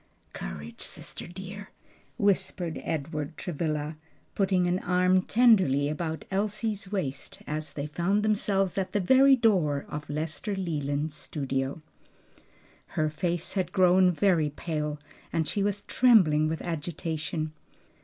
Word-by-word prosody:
"Courage, 75 +4 -7
sister - - -6
dear!" 190 +3 -8 0.5
whispered 190 -5 0
Edward 150 -1 -3
Travilla, 155 -2 -3 0.4
putting 190 -2 +2
an 175 +1 +1
arm 180 +1 +3
tenderly 190 - +4
about 160 0 -3
Elsie's 210 0 -1
waist 145 -9 -3
as 155 0 -4
they 140 - -3
found 175 +7 0
themselves 200 -3 +1
at 190 - -3
the 205 - +2
very 265 +8 +6
door 180 - +2
of 150 -1 -6
Lester 160 +7 -2
Leland's 150 -4 -2
studio. 135 0 -3 1.1
Her 155 -1 +2
face 170 +2 -2
had 185 -3 -1
grown 185 0 +5
very 170 -4 +2
pale 150 0 -3 0.3
and 160 -2 0
she 205 - -1
was 205 0 0
trembling 180 -12 +4
with 160 0 -3
agitation. 160 -1 -3
170 Hz, 125 wpm, -28 LUFS, 150-195 Hz, 1.1 s, very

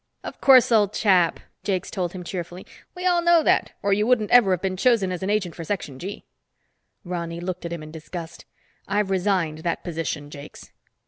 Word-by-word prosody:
"Of - - -8
course, 260 -3 +6
old 210 -3 +3
chap," 185 -6 +3 0.2
Jakes 190 -3 -2
told 180 -4 -3
him 185 -1 -7
cheerfully. 175 0 -6 0.3
"We 360 - -7
know 365 - +3
all 340 -2 +5
that, - - +2
or 200 0 +2
you 210 +2 +1
wouldn't 225 -4 +2
ever 245 -5 +6
have 185 -3 +1
been 190 -1 -1
chosen 205 -2 +2
as 180 - -4
an 190 - -2
agent 200 -5 0
for 165 - -7
Section 155 -7 -4
G." 195 +3 -7 0.8
Ronny 170 -1 -4
looked 180 0 -5
at 170 - -5
him 170 -2 -5
in 155 - -10
disgust. 160 +1 -8 0.4
"I've 200 0 0
resigned 185 -5 0
that 170 +1 -3
position, 160 -4 -4
Jakes." 145 0 -11
185 Hz, 195 wpm, -24 LUFS, 170-205 Hz, 0.8 s, course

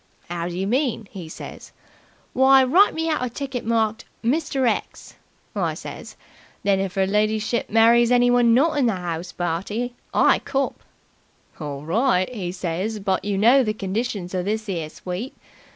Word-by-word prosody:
'Ow 170 -1 -2
do 175 0 -5
you 190 - -1
mean?' 240 -1 0
'e 175 -5 -8
says. - - -10 0.6
'Why, 265 0 +6
write 360 +11 +4
me 325 0 -1
out 310 -5 0
a 250 - -1
ticket 265 0 -5
marked 220 -1 0 0.2
"Mr. 270 0 +1
X.",' 225 - -3 0.4
I - - -1
says. - - -9 0.5
'Then, 200 -1 +2
if 195 -1 -3
'er 190 - +3
lidyship 215 +3 0
marries 230 +2 +5
anyone 245 -1 +4
not 295 +3 +3
in 255 - +3
the 225 - +2
'ouse 175 -1 -4
party, 195 +8 -3 0.2
I - - +4
cop!' 275 0 -2 0.8
'Orl 145 -2 -6
right,' 220 - +1
'e 185 -6 -4
says, 185 +4 -3
'but 195 -2 -1
you 205 -1 -1
know 240 +7 +6
the 215 -2 -1
conditions 200 -2 -3
of 180 -1 -1
this 215 +2 -2
'ere 165 -5 -3
sweep. 185 - -6
220 Hz, 165 wpm, -23 LUFS, 185-245 Hz, 0.8 s, Why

